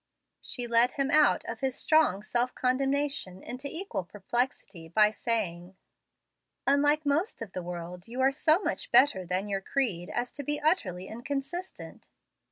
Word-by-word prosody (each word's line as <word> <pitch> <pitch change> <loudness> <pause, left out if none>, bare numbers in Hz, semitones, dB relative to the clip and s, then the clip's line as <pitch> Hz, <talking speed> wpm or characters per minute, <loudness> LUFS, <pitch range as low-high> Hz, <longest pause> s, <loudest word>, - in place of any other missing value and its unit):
She 245 - -2
led 235 +1 +4
him 275 0 0
out 305 - +4
of - - -6
his 265 -2 -1
strong 310 -11 +2
self 240 +3 0
condemnation 270 -6 0
into 255 +4 -6
equal 325 - -4
perplexity, 195 -3 -3
by 210 +5 +4
saying, 190 -6 -2 0.9
"Unlike 290 +2 +3
most 315 +10 0
of 210 - -10
the 185 - -5
world, 175 +1 -7
you 240 +3 -7
are 265 +1 +4
so 310 +4 +3
much - - -3
better 190 -10 +5
than 185 +3 -1
your 195 -1 -2
creed 195 -8 -1
as 240 0 -3
to 285 - -7
be 295 +2 -2
utterly 195 - 0
inconsistent." 275 - -6
245 Hz, 155 wpm, -28 LUFS, 190-285 Hz, 0.9 s, better